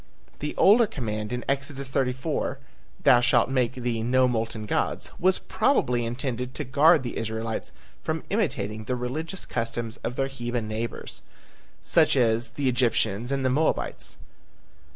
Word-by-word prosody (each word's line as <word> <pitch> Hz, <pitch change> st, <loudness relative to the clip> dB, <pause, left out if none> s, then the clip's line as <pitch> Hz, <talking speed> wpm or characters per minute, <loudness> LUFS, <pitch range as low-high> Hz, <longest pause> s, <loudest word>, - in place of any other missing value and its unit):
The 150 Hz, -, -3 dB
older 220 Hz, +3 st, +6 dB
command 110 Hz, -, -4 dB
in 125 Hz, 0 st, -3 dB
Exodus 140 Hz, -1 st, -2 dB
34, 135 Hz, +3 st, -1 dB, 0.5 s
"Thou 120 Hz, -, +7 dB
shall 120 Hz, -1 st, +4 dB
make 130 Hz, -1 st, 0 dB
thee 120 Hz, -3 st, -2 dB
no 130 Hz, +2 st, +3 dB
molten 115 Hz, -2 st, -2 dB
gods," -, -, -1 dB
was 185 Hz, +1 st, +4 dB
probably 125 Hz, -, +1 dB
intended 125 Hz, +1 st, -3 dB
to 150 Hz, -, -3 dB
guard 150 Hz, +4 st, +5 dB
the 120 Hz, -, -4 dB
Israelites 110 Hz, 0 st, -3 dB, 0.3 s
from 160 Hz, 0 st, -2 dB
imitating 110 Hz, -, -1 dB
the 125 Hz, -, -1 dB
religious 155 Hz, +9 st, -4 dB
customs 115 Hz, 0 st, -3 dB
of 120 Hz, -, -4 dB
their 135 Hz, -, +1 dB
heathen 120 Hz, -4 st, -3 dB
neighbors, 110 Hz, +2 st, -4 dB, 0.6 s
such -, -, +3 dB
as 115 Hz, -1 st, +3 dB
the 140 Hz, -2 st, -2 dB
Egyptians 120 Hz, -2 st, +1 dB
and 135 Hz, -1 st, 0 dB
the 130 Hz, -, +3 dB
Moabites. 155 Hz, +5 st, 0 dB
125 Hz, 145 wpm, -26 LUFS, 115-140 Hz, 0.6 s, Thou